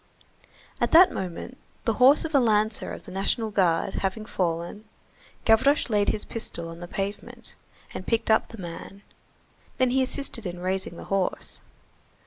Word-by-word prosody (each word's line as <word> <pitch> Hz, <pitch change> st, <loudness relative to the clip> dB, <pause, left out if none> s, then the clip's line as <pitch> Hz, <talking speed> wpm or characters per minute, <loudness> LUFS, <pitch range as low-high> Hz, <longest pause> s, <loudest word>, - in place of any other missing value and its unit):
At -, -, +1 dB
that 360 Hz, +3 st, +8 dB
moment, 190 Hz, +8 st, -6 dB, 0.3 s
the 225 Hz, -, +2 dB
horse 275 Hz, +5 st, +7 dB
of 320 Hz, -, -5 dB
a 280 Hz, -, +6 dB
lancer 215 Hz, -2 st, +1 dB
of -, -, -8 dB
the -, -, -11 dB
National 200 Hz, +4 st, -1 dB
Guard 185 Hz, -2 st, +2 dB
having 200 Hz, +3 st, -2 dB
fallen, 175 Hz, +1 st, -3 dB, 0.6 s
Gavroche 255 Hz, +4 st, +4 dB
laid 205 Hz, -1 st, +2 dB
his 210 Hz, -, -1 dB
pistol 170 Hz, -7 st, -4 dB
on 165 Hz, 0 st, -9 dB
the 175 Hz, -, -7 dB
pavement, 195 Hz, +3 st, -5 dB, 0.4 s
and 185 Hz, -, -7 dB
picked 230 Hz, -1 st, +1 dB
up 220 Hz, -, +3 dB
the 230 Hz, -, -11 dB
man, 185 Hz, +2 st, -8 dB, 0.7 s
then 255 Hz, -2 st, +2 dB
he 265 Hz, +1 st, +3 dB
assisted 260 Hz, -5 st, -1 dB
in 175 Hz, 0 st, -6 dB
raising 185 Hz, -1 st, -2 dB
the -, -, -8 dB
horse. 195 Hz, -2 st, -1 dB
210 Hz, 160 wpm, -26 LUFS, 185-235 Hz, 0.7 s, that